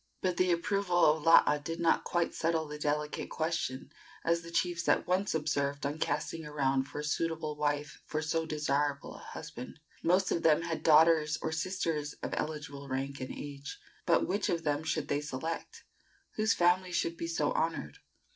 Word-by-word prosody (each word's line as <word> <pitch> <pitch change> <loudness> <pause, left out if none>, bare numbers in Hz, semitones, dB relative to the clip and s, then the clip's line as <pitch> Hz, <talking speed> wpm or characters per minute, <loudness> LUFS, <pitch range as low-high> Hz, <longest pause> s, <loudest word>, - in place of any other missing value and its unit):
But 180 -2 0
the 185 -1 +3
approval 180 0 +2
of 155 +1 +4
Laa 150 -2 +6
did 165 +3 -5
not 170 - +3
quite 175 -1 0
settle 165 -1 0
the 150 0 -7
delicate 150 0 -1
question, 160 -5 -2 0.3
as 170 0 +2
the 170 - -10
chiefs 170 0 0
at - - +3
once 185 0 +1
observed 145 -2 -1
on 145 +2 -2
casting 150 +2 -2
around 135 -3 0
for 145 - -6
a - - -7
suitable 155 0 -1
wife 145 0 -2
for 155 - -1
so 160 +1 -1
desirable 145 -2 -1
a - - -12
husband. 125 +5 -8 0.2
The - - -5
most 185 +2 +3
of 170 - +1
them 160 0 +4
had 165 -1 -3
daughters 160 -1 +5
or 160 - -1
sisters 160 -3 -2
of - - -3
eligible 150 -2 -4
rank 135 +1 -3
and 130 - -4
age. 140 -1 -7 0.3
But - - +4
which 200 +2 0
one 170 - +2
of 165 - -13
them 150 0 0
should 155 -1 -1
they 145 0 0
select? 150 +3 -5 0.5
Whose 220 +1 +1
family 180 +1 +3
should 170 -1 0
be 165 - -4
so 155 -3 0
honored? 160 - -2
155 Hz, 185 wpm, -31 LUFS, 145-170 Hz, 0.5 s, Laa